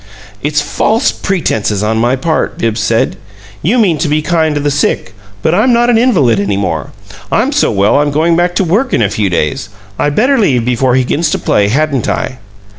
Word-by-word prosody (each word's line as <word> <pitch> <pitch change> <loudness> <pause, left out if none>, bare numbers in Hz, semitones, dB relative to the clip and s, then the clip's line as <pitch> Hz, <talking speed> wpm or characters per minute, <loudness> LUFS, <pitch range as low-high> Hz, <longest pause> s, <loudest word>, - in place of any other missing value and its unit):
"It's 150 +1 0
false 225 - 0
pretenses 110 - -1
on 110 +1 0
my 120 +3 +2
part," 155 +4 -2
Bibbs 115 -1 -1
said. 115 +1 0 0.4
"You 210 +10 +1
mean 185 -10 +2
to 160 - 0
be 150 +1 0
kind 160 -3 0
to 145 - -1
the 145 0 0
sick, 135 -8 -1 0.3
but 160 - +2
I'm 220 +7 +3
not 240 +1 +3
an 230 - +3
invalid 150 - +2
any 100 0 -1
more. 80 -8 -2 0.4
I'm 250 +6 +1
so 295 - +1
well 100 +5 +2
I'm 145 0 +1
going 160 +4 +1
back 175 +1 0
to 195 - +2
work 215 +10 0
in - - +1
a 100 - 0
few 105 -2 0
days. 80 +3 -2 0.3
I'd 145 0 0
better 260 +4 +2
leave 130 - +1
before 125 +1 +1
he 130 - +2
begins 150 +5 -1
to - - 0
play, 100 -1 +1
hadn't 140 +2 0
I?" 130 - -3
145 Hz, 210 wpm, -12 LUFS, 115-175 Hz, 0.4 s, I'm